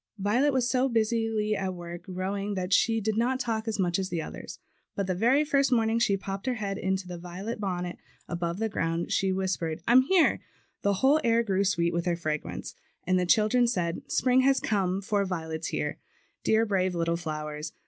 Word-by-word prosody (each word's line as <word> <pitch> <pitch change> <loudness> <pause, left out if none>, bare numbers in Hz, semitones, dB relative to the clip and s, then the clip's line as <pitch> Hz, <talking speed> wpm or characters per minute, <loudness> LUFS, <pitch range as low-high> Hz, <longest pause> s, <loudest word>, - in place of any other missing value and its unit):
Violet 225 +9 +2
was 260 -3 +1
so 260 +1 +2
busily 225 -2 +1
at 190 -2 -3
work 175 0 -8
growing 195 +2 -3
that 185 0 -2
she 225 +3 +3
did 220 0 -1
not 255 +3 +1
talk 225 -3 -2
as 220 - -1
much 180 -2 +1
as 190 -1 -2
the 170 - -2
others; - - -7 0.4
but 200 - -1
the 185 - -1
very 240 +10 +3
first 275 -2 +2
morning 225 -1 +2
she 200 -4 +2
popped 195 +3 -6
her 255 - +1
head 200 -3 -3
in 190 +1 0
its 190 0 -2
violet 180 +5 -6
bonnet 180 -3 -3 0.3
above 170 0 -3
the 225 +2 0
ground 165 -6 -1
and 170 +1 -1
whis - - 0
28 190 -2 +1
MARCH'S 190 -1 0
CALL. 165 - -3
pered, 160 -1 -4
'I'm 245 +2 +7
here/' 370 -2 +4 0.4
the 200 - +2
whole 270 +9 +3
air 230 -1 +3
grew 195 -3 +1
sweet 170 -3 +1
with 170 +1 -1
her 175 - +2
fragrance; 155 -3 -4 0.3
and 185 +1 +2
the 180 - 0
children 225 +5 +4
said, 175 -7 -1
"Spring 255 +1 +3
has 270 +1 +3
come, 195 -2 0
for 205 +1 0
the - - -4
violet's 160 -3 -4
here." - - -3 0.4
Dear, 220 +1 +3
brave 185 -3 0
little 170 0 0
flowers! 155 -2 -5
195 Hz, 215 wpm, -28 LUFS, 175-225 Hz, 0.4 s, I'm